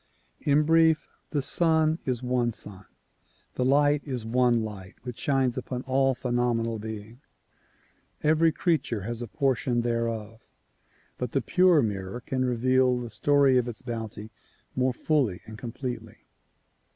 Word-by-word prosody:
In 145 +1 +3
brief; 160 0 +4 0.2
the 145 -3 -1
sun 160 +1 +3
is 125 -2 -2
one 125 -2 0
sun, 100 -3 -8 0.7
the 125 - -1
light 145 +2 +3
is 125 -6 -4
one 120 0 +2
light 95 -4 -8
which 125 -2 -7
shines 130 -3 +1
upon 125 0 -5
all 135 0 +2
phenomenal 120 -2 -1
being. 110 +3 -8 1.0
Every 160 +2 +4
creature 145 - 0
has 115 +4 -5
a 120 - -4
portion 125 -1 0
there 115 -1 0
of, 110 0 -7 0.8
but 125 -2 -3
the 135 - +2
pure 180 -5 +4
mirror 100 +1 -3
can 130 +2 -2
reveal 130 +1 +2
the 120 -2 -6
story 140 -3 +4
of 125 - -2
its 120 0 -7
bounty 110 -3 -6 0.4
more 130 0 +2
fully 125 - 0
and 110 - -9
completely. 125 +2 -7
125 Hz, 140 wpm, -27 LUFS, 115-140 Hz, 1.0 s, brief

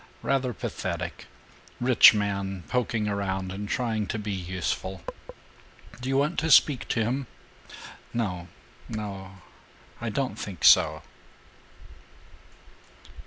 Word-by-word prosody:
Rather 135 -2 +1
pathetic: 115 - -5 0.5
rich 125 0 +8
man 100 -3 -2
poking 115 -3 0
around 95 -2 -2
and 100 +2 -6
trying 115 -5 -1
to 110 - -3
be 105 -1 -4
useful. 95 0 -3 1.0
Do 130 - -3
you 135 - +2
want 150 +5 +1
to 160 +1 -1
speak 140 -2 +5
to 115 - +1
him?" 125 +3 -2 0.8
"No 90 -7 -3 0.4
no 100 -3 -6 0.7
I 120 - -2
don't 110 -1 -2
think 95 -5 -7
so." 80 -1 +6
105 Hz, 110 wpm, -27 LUFS, 95-125 Hz, 1.0 s, rich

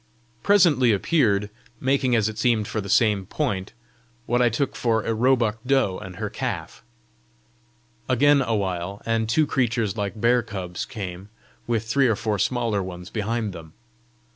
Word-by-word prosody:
Presently 165 - +4
appeared, 105 - +1 0.3
making 130 -2 +1
as 110 -2 +2
it 110 -1 -5
seemed 115 -4 +2
for 110 - -3
the 100 - -8
same 105 -3 +2
point, 100 -9 -2 0.5
what 120 +1 +1
I 120 - +4
took 125 +4 -2
for 115 -3 0
a 115 - -1
roebuck 115 -1 +2
doe 130 -8 +1
and 95 -1 -9
her 105 +3 -3
calf. - - -5 1.3
Again 140 +3 +4
a 115 -3 0
while, 95 -1 -3
and 115 -1 0
two 155 +7 +3
creatures 120 -7 0
like 100 +1 -3
bear 120 +2 +3
cubs 95 -5 -5
came, 95 -5 -7 0.4
with 115 -2 0
three 130 +4 +2
or 110 - +2
four 105 -1 -2
smaller 115 -5 0
ones 90 -1 -8
behind 110 -1 -2
them. 80 -2 -11
110 Hz, 160 wpm, -24 LUFS, 100-125 Hz, 1.3 s, Presently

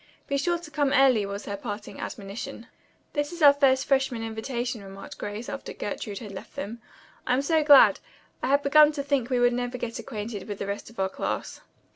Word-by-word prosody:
"Be 280 - -2
sure 345 +5 +1
to 335 -3 -12
come 290 -2 +1
early," 255 -6 +4
was 200 +1 -6
her 200 - -3
parting 205 0 -7
admonition. 200 +2 -6 0.5
"This 290 +1 -1
is 345 -2 -4
our 285 -1 +9
first 270 -2 +3
freshman 265 -4 +1
invitation," 230 0 -4
remarked 195 0 -10
Grace 210 +3 -5
after 275 - -6
Gertrude 205 0 -5
had 210 -2 -7
left 190 - -10
them. 225 +4 -6 0.5
"I'm 255 +2 +2
so 315 +1 +2
glad. 290 -2 +7 0.4
I - - -1
had 280 +2 +3
begun 300 +1 +6
to 285 -2 -3
think 275 -4 0
we 250 -2 +1
would 245 0 +4
never 245 +1 -2
get 230 -1 -4
acquainted 215 -2 -6
with 205 -2 -5
the - - -4
rest 200 +2 -5
of 230 - -14
our 190 - +2
class." 190 - -4
245 Hz, 205 wpm, -26 LUFS, 210-280 Hz, 0.5 s, our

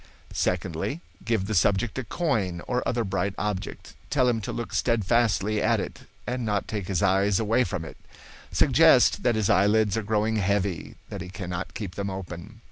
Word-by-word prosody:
"Secondly, 90 - -1 0.2
give 110 -5 0
the 110 - -3
subject 100 +3 +2
a - - -3
coin 105 - -1
or 125 0 0
other 120 -1 0
bright 95 -1 -1
object. 105 -3 -4 0.2
Tell 130 -3 +2
him 115 -2 +1
to - - -4
look 120 - -5
steadfastly 110 -2 +1
at - - +2
it - - -6 0.2
and 125 0 -2
not 105 -3 -1
take 105 -5 -4
his 95 -1 0
eyes 95 0 +3
away 115 +3 +2
from 95 -8 -4
it. - - -10 0.5
Suggest - - +5
that 120 -2 +2
his 110 -3 +1
eyelids 105 +2 +3
are - - 0
growing 110 +1 0
heavy, 100 -2 -1
that - - -6
he 90 - -7
cannot 90 -1 -5
keep 100 -5 -5
them 100 +1 -3
open. 95 +3 -7
105 Hz, 180 wpm, -26 LUFS, 95-115 Hz, 0.5 s, Suggest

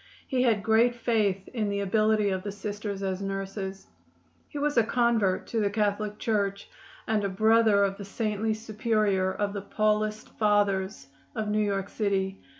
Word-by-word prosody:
He 260 -2 0
had 225 -5 +2
great 225 +2 +3
faith 215 -5 0
in 220 -5 -2
the 200 0 -1
ability 215 +1 +2
of 190 -1 -1
the 205 - -5
Sisters 205 0 -5
as 190 0 -2
nurses. 195 0 -4 0.6
He - - -7
was 290 +1 0
a 230 - +5
convert 225 -5 +1
to 230 - -1
the 205 -2 +2
Catholic 210 0 -1
Church, 200 -3 -1 0.4
and 215 -2 0
a 200 - 0
brother 220 +1 +4
of 195 0 0
the 200 - -7
saintly 215 +1 -1
superior 215 -3 0
of 200 +1 -2
the 200 - -4
Paulist 215 +1 0
Fathers 205 -3 +1 0.3
of 215 -2 -2
New 210 +1 +1
York 200 -2 -1
city. 195 -2 -1
210 Hz, 165 wpm, -27 LUFS, 195-220 Hz, 0.6 s, a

